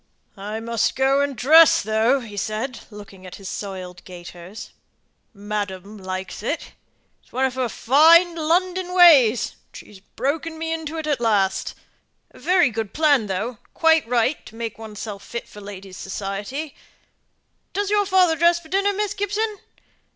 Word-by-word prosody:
"I 210 +2 -6
must 230 0 -1
go 270 +1 +2
and 285 -2 -2
dress, 315 +7 +7
though," 220 +5 +2
said 220 +5 -3
he, - - -12
looking 200 -3 -12
at 180 - -9
his 195 - -10
soiled 185 -3 -7
gaiters. 180 +2 -11 0.6
"Madam 205 -1 -5
likes 185 -1 -6
it. 290 +9 -4 0.5
It's - - -29
one 260 +2 0
of 260 - -1
her 255 -2 -2
fine 330 +10 +5
London 360 +3 0
ways, 270 - +6
and - - -13
she's 205 - -13
broken 290 +10 -4
me 325 0 -3
into 320 0 -5
it 315 - -4
at 290 -5 -1
last. 200 -4 +1 0.6
Very 355 -7 +2
good 220 -2 -4
plan, 290 -8 +3
though, 195 +4 -2
and 245 - -17
quite 320 -4 +3
right 245 +4 0
to 220 - -13
make 225 -1 -6
oneself 210 -2 -8
fit 235 - -7
for 210 - -13
ladies' 195 -2 -10
society. 205 +10 -5 1.0
Does 405 0 -2
your 410 -1 +2
father 365 -4 +4
dress 340 +2 +3
for 320 -2 -17
dinner, 395 +2 +1
Miss 415 0 -1
Gibson?" 410 +1 -2
245 Hz, 160 wpm, -22 LUFS, 205-325 Hz, 1.0 s, dress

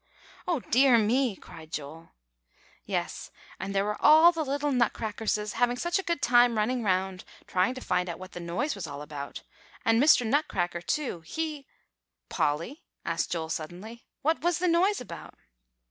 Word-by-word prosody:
"Oh, 335 -7 0
dear 255 +1 +4
me!" 230 +1 +2
cried 160 -3 -13
Joel. 155 +3 -7 0.8
"Yes; - - -3 0.3
and 195 +1 -4
there 195 +1 +2
were 210 0 -3
all 315 +3 +8
the 330 -2 -2
little 285 +1 -1
Nutcrackerses 220 -3 -1
having 245 +1 +1
such 345 +7 0
a - - -3
good 340 -6 -2
time 240 -1 +5
running 245 +4 0
round, 190 -2 -1 0.2
trying 185 +7 +1
to 255 - -7
find 180 -6 0
out 170 - -4
what 185 0 -10
the - - -7
noise 175 - -2
was 190 -5 -6
all 145 0 -7
about, 145 -1 -7 0.4
and 225 +1 +4
Mr. 275 -4 +6
Nutcracker, 195 - 0
too, 250 - -2
he" 300 - -5 0.6
"Polly," 165 - -1 0.2
asked - - -1
Joel 160 -2 -2
suddenly, 180 +10 -7 0.2
"what 320 +3 +1
was 345 -1 +1
the 360 - 0
noise 360 +5 +3
about?" 170 -10 -9
225 Hz, 165 wpm, -28 LUFS, 180-285 Hz, 0.8 s, all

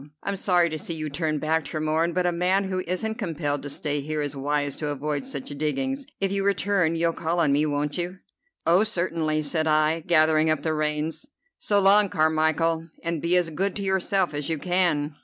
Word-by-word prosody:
I'm 200 - -1
sorry 180 -3 +3
to 155 - -4
see 165 - -4
you 155 -2 -4
turn 155 0 -1
back, 160 +2 0
Tremorne, 155 +2 0
but 180 -1 +1
a 175 - +2
man 180 +3 +1
who 190 -1 -2
isn't 220 +6 -2
compelled 145 - -2
to 145 - -6
stay 145 0 -2
here 155 +2 -3
is 145 -1 -3
wise 145 0 0
to 150 - -3
avoid 145 0 -3
such 140 -2 -6
diggings. 265 - -2
If 195 -1 0
you 195 0 0
return 195 -4 +1
you'll 165 0 +1
call 165 +2 -2
on 155 -4 +3
me, 150 +2 +2
won't 145 +2 -2
you?" 175 +2 -3 0.5
"Oh, 175 +5 +5
certainly," 165 -6 -1
said 155 +2 0
I, 155 +1 +3
gathering 155 -1 +3
up 155 -2 0
the 160 - 0
reins. 155 - -2 0.3
"So 205 -1 +2
long, 200 +1 +5
Carmichel, 160 0 +1
and 165 -2 -2
be 175 +2 +2
as 175 -2 0
good 190 +5 -1
to 200 - -4
yourself 190 -3 0
as 145 0 -3
you 160 - 0
can." 160 -3 0
160 Hz, 205 wpm, -25 LUFS, 150-180 Hz, 0.5 s, Oh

